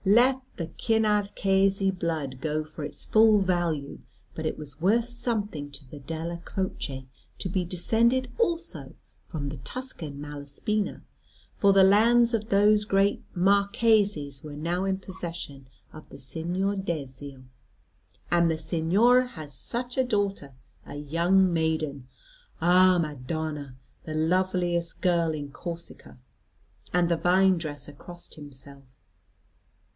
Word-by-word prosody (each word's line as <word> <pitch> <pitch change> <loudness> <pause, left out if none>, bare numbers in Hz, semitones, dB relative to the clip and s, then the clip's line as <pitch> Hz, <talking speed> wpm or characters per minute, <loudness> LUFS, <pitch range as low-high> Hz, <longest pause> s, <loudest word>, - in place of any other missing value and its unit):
"Let 245 +6 +4
the 170 - -3
Cinarchesi 200 -3 +2
blood 160 -8 -3
go 155 +1 -1
for 155 0 -9
its 145 - -6
full 220 -1 +5
value; 175 -6 -1 0.3
but 160 0 -3
it - - -3
was 145 -1 -8
worth 225 +6 +3
something 220 - -3
to 140 -1 -9
the 145 +3 -10
Della 165 +4 -5
Croce 145 -9 -4 0.3
to - - -4
be 185 0 0
descended 230 +8 +1
also 345 -7 -1 0.3
from 145 -4 -4
the 145 - -6
Tuscan 155 - -6
Malaspina; 145 +8 -3 0.5
for 200 - +4
the 195 0 +6
lands 230 +5 +5
of 220 0 -1
those 210 +1 +4
great 200 0 +2
Marquises 200 -6 +2
were 150 -1 -8
now 170 +5 -1
in 190 -1 +1
the - - -23
possession 165 -7 -6 0.3
of 155 - -12
the - - -11
Signor 175 +8 -1
Dezio. 140 -7 -5 0.9
And 170 -1 +4
the 160 - 0
Signor 175 +10 +3
had 155 -12 -9
such 245 - -4
a - - +5
daughter, 200 - -1 0.3
a 145 - -9
young 170 +5 +2
maiden. 155 -5 -1 0.5
Ah, 180 +2 +5
Madonna! 150 -2 -3 0.3
The 155 - -5
loveliest 175 +1 0
girl 170 -3 +2
in 145 -2 -6
Corsica. 170 -3 -8 0.7
And 180 -1 +3
the 170 -1 +1
vine 185 +1 +4
dresser 145 -3 -6
crossed 175 +4 -11
himself. 140 -2 -11
175 Hz, 130 wpm, -27 LUFS, 150-200 Hz, 0.9 s, the